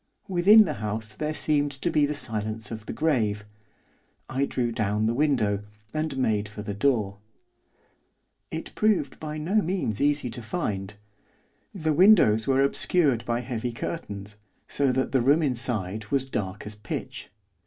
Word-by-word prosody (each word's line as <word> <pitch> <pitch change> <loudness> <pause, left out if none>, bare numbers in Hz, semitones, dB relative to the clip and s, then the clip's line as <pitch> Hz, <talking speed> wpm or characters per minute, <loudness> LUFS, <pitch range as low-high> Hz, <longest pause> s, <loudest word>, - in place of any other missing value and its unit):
Within 195 +4 +7
the 155 - -2
house 110 +1 -4
there 150 +7 -3
seemed 145 -2 +1
to 155 +5 -2
be 145 -1 +3
the 150 - -2
silence 110 -4 -3
of 110 -1 -7
the - - -3
grave. 110 -10 0 0.8
I 135 +1 0
drew 120 -3 -1
down 105 -1 0
the 115 - +1
window, 120 -8 +1 0.3
and 155 -3 -2
made 105 -5 0
for 105 0 -8
the 105 -1 -4
door. 105 -3 0 1.3
It 160 - -6
proved 205 -11 +1
by 155 -1 -5
no 185 +8 +1
means 170 - -2
easy 145 -3 +1
to 120 - -6
find. 105 - -3 0.8
The 160 -4 0
windows 155 - +5
were 135 0 +3
obscured 140 -3 +2
by 120 0 -1
heavy 120 -1 -3
curtains, 105 -7 -6 0.3
so 140 -2 +1
that 130 +1 0
the 130 - +3
room 145 +6 +4
inside 110 -6 -1
was 135 +2 0
dark 100 -5 -4
as 105 - -5
pitch. 105 -3 -6
125 Hz, 155 wpm, -26 LUFS, 105-150 Hz, 1.3 s, Within